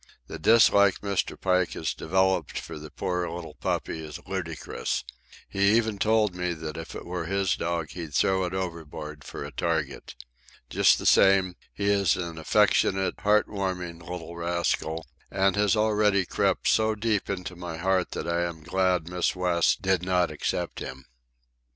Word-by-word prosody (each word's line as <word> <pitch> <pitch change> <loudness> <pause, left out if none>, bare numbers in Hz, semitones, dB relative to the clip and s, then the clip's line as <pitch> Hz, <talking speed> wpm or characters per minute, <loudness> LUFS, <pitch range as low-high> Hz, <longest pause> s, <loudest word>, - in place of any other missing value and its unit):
The - - -8
dislike 100 0 +5
Mr. 100 -2 -2
Pike 90 -1 +1
has 80 - -2
developed 95 -1 0
for - - -8
the 75 0 -9
poor 90 +1 -2
little 85 -2 -7
puppy 80 +1 -3
is 75 -1 -7
ludicrous. 85 -5 -3 0.4
He 100 +3 +3
even 110 -3 0
told 110 -2 +2
me 90 0 -2
that 80 -1 -6
if 80 0 -7
it - - -7
were 90 -1 -4
his 95 0 +1
dog 85 -2 -2
he'd 80 -5 -7
throw 95 +4 +2
it 90 - -4
overboard 80 -5 -6
for - - -7
a 70 - -8
target. 80 -4 -2 0.6
Just - - +5
the - - -6
same, 95 -2 +5 0.2
he 100 - -4
is 100 -4 +3
an 85 -3 -5
affectionate, 95 +1 +2
heart 105 +1 +3
warming 90 -4 -4
little 85 -1 -7
rascal, 85 -1 -1 0.2
and 95 +1 +2
has 105 +1 +3
already 105 -2 +2
crept - - 0
so 110 0 +3
deep 105 -1 -1
into 90 -2 -4
my 85 -2 -6
heart 95 +1 +1
that - - -4
I 85 0 0
am 85 -3 -4
glad 90 -1 +1
Miss 90 +1 0
West 90 +1 +1
did 95 -2 +2
not 90 -2 +1
accept 75 - -3
him. 65 0 -7
90 Hz, 165 wpm, -27 LUFS, 85-100 Hz, 0.6 s, dislike